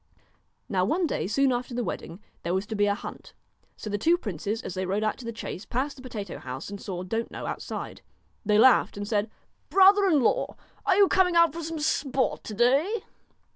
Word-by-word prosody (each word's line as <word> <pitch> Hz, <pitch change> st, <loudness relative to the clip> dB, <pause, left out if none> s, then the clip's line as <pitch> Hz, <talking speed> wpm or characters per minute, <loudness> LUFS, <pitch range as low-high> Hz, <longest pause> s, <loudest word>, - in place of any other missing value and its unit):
Now 185 Hz, -2 st, +1 dB
one 330 Hz, -, +1 dB
day, 300 Hz, -, -2 dB
soon 270 Hz, +6 st, +2 dB
after 245 Hz, 0 st, -3 dB
the 245 Hz, -, -1 dB
wedding, 175 Hz, -3 st, -6 dB, 0.2 s
there 170 Hz, +2 st, -1 dB
was 190 Hz, +2 st, -1 dB
to 220 Hz, -, -5 dB
be 205 Hz, 0 st, +2 dB
a 200 Hz, -, +2 dB
hunt. -, -, -9 dB, 0.4 s
So -, -, -8 dB
the 205 Hz, 0 st, -2 dB
two 335 Hz, +10 st, +4 dB
princes, 210 Hz, -, -4 dB
as -, -, -5 dB
they 185 Hz, -, -2 dB
rode 200 Hz, +3 st, 0 dB
out 215 Hz, -, 0 dB
to 250 Hz, -, -9 dB
the 230 Hz, -, -3 dB
chase, 215 Hz, -4 st, -6 dB
passed 270 Hz, +4 st, -2 dB
the 260 Hz, -, -13 dB
potato 215 Hz, -7 st, -6 dB
house, 130 Hz, +9 st, -7 dB
and 200 Hz, -, -7 dB
saw 180 Hz, -2 st, -5 dB
Don't 225 Hz, +5 st, -2 dB
know -, -, -7 dB
outside. -, -, -5 dB, 0.4 s
They 210 Hz, -1 st, +3 dB
laughed 245 Hz, -2 st, +5 dB
and 205 Hz, 0 st, -4 dB
said: 210 Hz, 0 st, 0 dB, 0.4 s
'Brother 395 Hz, +1 st, +6 dB
in 315 Hz, -6 st, +4 dB
law, -, -, +1 dB, 0.3 s
are 380 Hz, -, +5 dB
you 400 Hz, 0 st, +6 dB
coming 370 Hz, -2 st, +3 dB
out 335 Hz, -3 st, +5 dB
for 335 Hz, -, -5 dB
some 325 Hz, 0 st, -4 dB
sport 275 Hz, -3 st, 0 dB
to 215 Hz, -, -6 dB
day 280 Hz, -, +2 dB
235 Hz, 215 wpm, -27 LUFS, 205-315 Hz, 0.4 s, Brother